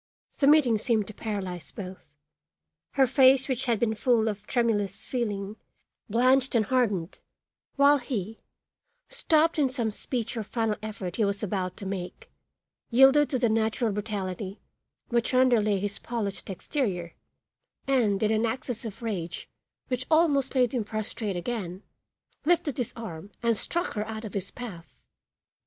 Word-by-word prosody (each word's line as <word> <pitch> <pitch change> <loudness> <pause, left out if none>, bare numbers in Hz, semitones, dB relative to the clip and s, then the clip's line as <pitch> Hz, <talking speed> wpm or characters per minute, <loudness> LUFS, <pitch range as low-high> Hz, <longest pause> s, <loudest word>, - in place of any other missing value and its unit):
The 275 - +4
meeting 275 -7 +5
seemed 220 -2 +2
to 215 - -9
paralyze 190 -6 -4
both; 185 -4 -9 0.9
her 270 -1 +5
face 265 +1 +5
which 260 -1 -1
had 230 -3 +2
been 225 -2 +1
full 225 0 +2
of 210 -1 -4
tremulous 215 -6 0
feeling 210 -4 -3 0.5
blanched 255 +4 +3
and 220 -2 +3
hardened, 205 -9 0 0.6
while 285 +1 +5
he, 225 -4 -4 0.7
stopped 330 -9 +2
in 275 -3 +3
some 240 -4 -1
speech 235 +2 -4
or 225 - -2
final 220 0 -1
effort 205 -5 -5
he 225 - +2
was 200 +1 -1
about 185 -3 -2
to 200 - -7
make, 190 -2 -6 0.6
yielded 270 +4 +6
to 260 - 0
the 245 -1 +2
natural 220 +1 +1
brutality 200 -1 -4 0.5
which 235 +1 +1
underlay 235 -5 +4
his 200 +1 -3
polished 215 -6 -4
exterior, 185 - -2 0.7
and, 225 -7 +2
in 215 - +3
an 220 0 +2
access 245 0 -3
of 225 +1 -7
rage 175 -7 -4 0.4
which 255 0 -2
almost 290 -5 +3
laid 250 -2 +3
him 245 -4 0
prostrate 215 -1 -3
again, 185 -1 -4 0.6
lifted 320 -4 +1
his 245 - -1
arm 195 -5 -7
and 230 -1 +3
struck 345 - -1
her 210 -1 -3
out 220 0 -5
of 210 - -7
his 195 -2 -3
path. 195 -9 -10
225 Hz, 150 wpm, -27 LUFS, 200-255 Hz, 0.9 s, yielded